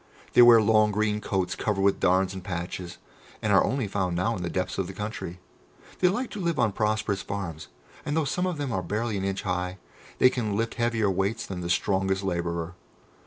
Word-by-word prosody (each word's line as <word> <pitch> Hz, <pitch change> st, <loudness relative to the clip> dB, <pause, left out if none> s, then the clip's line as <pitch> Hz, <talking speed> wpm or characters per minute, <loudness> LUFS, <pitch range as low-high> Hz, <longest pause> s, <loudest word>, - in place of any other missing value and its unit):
"They -, -, +7 dB
wear 120 Hz, -1 st, +9 dB
long 110 Hz, 0 st, +4 dB
green 105 Hz, 0 st, 0 dB
coats 95 Hz, -3 st, -1 dB
covered 100 Hz, -1 st, -1 dB
with 100 Hz, 0 st, +3 dB
darns 95 Hz, 0 st, +2 dB
and 95 Hz, -1 st, -7 dB
patches, 90 Hz, 0 st, -5 dB, 0.4 s
and -, -, 0 dB
are -, -, +6 dB
only 130 Hz, -4 st, -1 dB
found 95 Hz, -3 st, -1 dB
now 110 Hz, +7 st, 0 dB
in 90 Hz, -, -5 dB
the 85 Hz, -, -2 dB
depths 90 Hz, +1 st, -2 dB
of 95 Hz, -, -1 dB
the 95 Hz, -, -7 dB
country. 105 Hz, -4 st, -5 dB, 0.6 s
They 180 Hz, -, +4 dB
like 240 Hz, +7 st, -1 dB
to 210 Hz, -, -6 dB
live 170 Hz, -4 st, -1 dB
on 110 Hz, -3 st, +2 dB
prosperous 105 Hz, -1 st, 0 dB
farms, 90 Hz, -6 st, -5 dB, 0.4 s
and 145 Hz, +2 st, -2 dB
though 160 Hz, -, +2 dB
some 180 Hz, +7 st, 0 dB
of 180 Hz, -3 st, -2 dB
them 145 Hz, -3 st, -3 dB
are 95 Hz, -4 st, -1 dB
barely 105 Hz, +5 st, -2 dB
an 95 Hz, -, -3 dB
inch 95 Hz, 0 st, -2 dB
high, 90 Hz, 0 st, -2 dB, 0.4 s
they 130 Hz, -, +6 dB
can 110 Hz, -6 st, -2 dB
lift 115 Hz, +1 st, -1 dB
heavier 115 Hz, -4 st, +1 dB
weights 95 Hz, +4 st, -1 dB
than 90 Hz, -2 st, -5 dB
the 85 Hz, -, -4 dB
strongest 95 Hz, +1 st, +1 dB
labourer. 85 Hz, -2 st, -2 dB
100 Hz, 215 wpm, -27 LUFS, 90-115 Hz, 0.6 s, wear